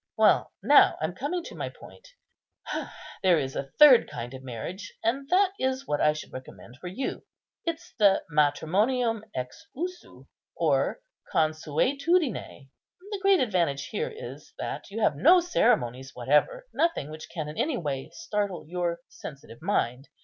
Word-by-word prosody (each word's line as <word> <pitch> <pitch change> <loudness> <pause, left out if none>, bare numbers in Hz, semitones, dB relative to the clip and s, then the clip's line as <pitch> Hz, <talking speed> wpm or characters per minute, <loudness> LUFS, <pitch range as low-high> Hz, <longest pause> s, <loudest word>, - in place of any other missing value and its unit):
Well, - - +4
now - - +6
I'm - - -2
coming 355 -1 -3
to - - -9
my - - -4
point. - - -15 1.1
There 185 -3 +5
is 135 -3 -2
a 135 - -4
third 285 -5 +8
kind 120 +1 -6
of 130 - -8
marriage, 135 - -6
and 275 +5 0
that 380 +1 +4
is 260 +1 -1
what 145 - -1
I 150 - +4
should 155 - -9
recommend 130 -1 -10
for 180 - -7
you. 210 +10 -4 0.4
It's 335 -1 -4
the 200 -2 +5
matrimonium 200 - +2
ex 125 - -5
usu, 355 +5 -6 0.3
or - - +1 0.3
consuetudine; 160 - 0 0.4
the 410 - -3
great 390 -4 +5
advantage 170 - 0
here 470 +2 -2
is, 450 +1 -10
that - - -5
you 220 +3 -4
have 155 - +3
no 340 - +6
ceremonies 135 - +1
whatever, 150 - +2
nothing 330 - 0
which 155 +1 -9
can 155 -3 -4
in 150 - -7
any 265 +3 0
way 140 -5 -3
startle 195 -4 -3
your 170 0 -2
sensitive 140 -4 -11
mind. 135 - -1
185 Hz, 150 wpm, -27 LUFS, -, 1.1 s, third